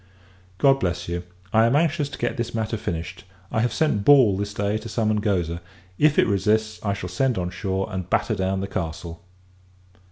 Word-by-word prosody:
God 135 +3 +4
bless 90 -3 -2
you! 85 0 -2 0.3
I 110 +1 +5
am 120 - +2
anxious 155 -1 +1
to 145 - -8
get 120 +2 -1
this 120 -2 -3
matter 110 0 -1
finished. 90 -2 -5 0.3
I 110 - 0
have 120 - +1
sent 150 -11 +1
Ball, 130 -6 +6
this 100 +1 -3
day, 105 +1 -1
to 115 +1 -8
summon 110 -1 +1
Goza; 90 -6 -1 0.4
if 150 0 +4
it - - +5
resists, 110 +2 0
I 100 -2 0
shall 90 - -5
send 120 +7 0
on 90 -1 -2
shore, 95 +1 -2
and 95 -1 -4
batter - - +1
down 95 0 -1
the 100 - -3
castle. 85 -2 -5
105 Hz, 195 wpm, -24 LUFS, 95-115 Hz, 0.4 s, Ball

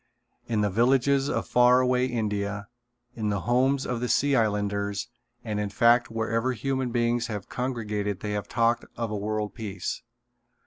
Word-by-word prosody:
In 110 -3 0
the 105 -1 +1
villages 135 +5 +3
of - - -2
far 125 +1 +5
away 125 0 +2
India, 105 -4 -2 0.5
in 110 -2 -2
the 100 -2 -1
homes 130 +5 +2
of 125 -1 -2
the 125 0 -2
Sea 140 0 +3
Islanders 100 -2 0 0.4
and 105 -3 -3
in 105 -1 -1
fact 120 +4 +4
wherever 115 +2 -1
human 130 +2 -2
beings 120 0 0
have 105 -4 -6
congregated 105 -6 -3
they 105 - -3
have 105 -1 -3
talked 115 0 +1
of 115 -2 -2
a - - -2
world 105 0 -2
peace. 110 -4 -5
115 Hz, 165 wpm, -26 LUFS, 105-125 Hz, 0.5 s, far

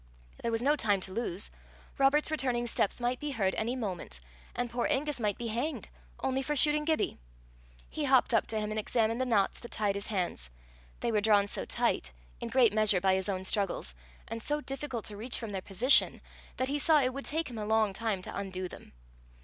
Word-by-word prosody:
There 235 - -1
was 225 +1 -1
no 290 +3 +4
time 205 -8 +2
to 190 - -5
lose. 205 -4 -3 0.5
Robert's 290 +3 +4
returning 250 -6 0
steps 230 -2 0
might 245 +1 0
be 295 - -3
heard 200 -8 0
any 235 +3 -1
moment, 185 - -5 0.4
and 245 - -1
poor 240 0 0
Angus 295 0 0
might 210 -3 0
be 240 - -5
hanged 240 +8 -2 0.3
only 265 0 0
for 295 +3 -2
shooting 300 +2 +3
Gibbie! 315 -1 0 0.7
He 305 - -3
hopped 260 -2 +4
up 225 - +3
to 220 - -1
him 210 0 -2
and 215 - -1
examined 225 +2 +1
the 260 - 0
knots 210 -5 +2
that 240 - -10
tied 210 -2 0
his 200 0 -5
hands: 175 - -2 0.5
they 235 - 0
were 210 -2 +2
drawn 205 -1 +4
so 205 - -4
tight - - 0 0.3
in 235 - -4
great 235 -3 +4
measure 215 -3 +3
by 190 +1 +3
his 190 +1 0
own 190 -1 -2
struggles 190 - 0 0.3
and 225 +1 -5
so 295 +6 0
difficult 270 -5 -5
to 205 - -6
reach 235 +4 -1
from 225 -3 -5
their 190 -2 -3
position, 225 +9 +3 0.4
that 260 - 0
he 290 +1 0
saw 310 +1 +5
it 255 -2 +1
would 275 +1 -6
take 320 +2 -1
him 235 -3 -7
a 210 - -3
long 220 -2 +3
time 210 -2 -2
to - - -7
undo 185 -2 -3
them. - - -12
230 Hz, 215 wpm, -31 LUFS, 205-265 Hz, 0.7 s, saw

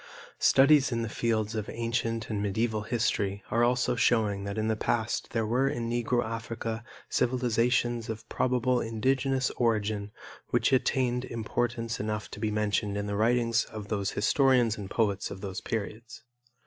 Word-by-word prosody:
Studies 140 0 +5
in 115 -1 -1
the 115 - -3
fields 110 -1 -1
of 110 -1 -3
ancient 115 -1 -2
and 105 -2 -1
medieval 110 +2 0
history 105 -3 -1
are 115 +1 +3
also 125 0 +2
showing 105 -4 +2
that 100 +1 -4
in 110 0 0
the 110 - +1
past 110 +1 -1
there 115 -1 -1
were 125 +5 +2
in 120 -5 -3
Negro 120 0 0
Africa 115 0 -4 0.2
civilizations 120 -1 +1
of 110 -1 -6
probable 125 0 +1
indigenous 130 +4 0
origin 105 -3 0 0.4
which 120 +3 +1
attained 125 -1 +1
importance 115 0 -2
enough 105 0 -3
to - - -8
be 110 0 0
mentioned 105 -1 0
in 100 - -2
the 100 0 -2
writings 115 +1 +2
of 105 -2 -8
the 105 - 0
historians 120 +3 +2
and 100 -2 -7
poets 105 -3 0
of 95 - -8
those 100 0 -5
periods. 115 +6 -5
115 Hz, 160 wpm, -29 LUFS, 105-120 Hz, 0.4 s, Studies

